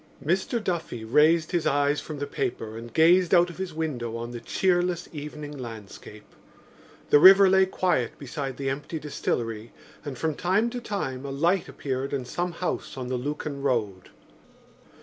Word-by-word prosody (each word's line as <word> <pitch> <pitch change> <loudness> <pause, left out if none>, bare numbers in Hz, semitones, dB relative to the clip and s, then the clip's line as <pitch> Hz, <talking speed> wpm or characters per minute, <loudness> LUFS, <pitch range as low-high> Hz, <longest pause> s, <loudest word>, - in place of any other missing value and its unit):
Mr 190 +8 0
Duffy 160 - -3
raised 155 +7 +4
his 170 -4 0
eyes 145 0 +2
from 155 - -7
the 145 - -3
paper 115 -5 -4
and 115 +1 -8
gazed 175 +3 +5
out 175 0 +4
of 170 - -13
his 190 -2 -3
window 130 -8 -3
on 120 +1 -5
the 120 - -6
cheerless 175 +3 0
evening 150 0 -7
landscape. 110 -4 -9 0.9
The 145 - +8
river 195 +4 +9
lay 190 0 +4
quiet 180 -10 0
beside 140 -1 -5
the 135 -1 -1
empty 145 +4 -5
distillery 115 -7 -3 0.3
and 140 -4 -6
from 160 +2 -1
time 195 +9 +1
to 245 0 -5
time 135 - -4
a 140 - -5
light 170 +7 +1
appeared 135 0 -4
in 135 -3 -2
some 175 +7 -3
house 175 -5 -4
on 125 -1 -5
the 130 - -1
Lucan 145 +2 -4
road. 110 -9 -1
145 Hz, 170 wpm, -26 LUFS, 125-175 Hz, 0.9 s, river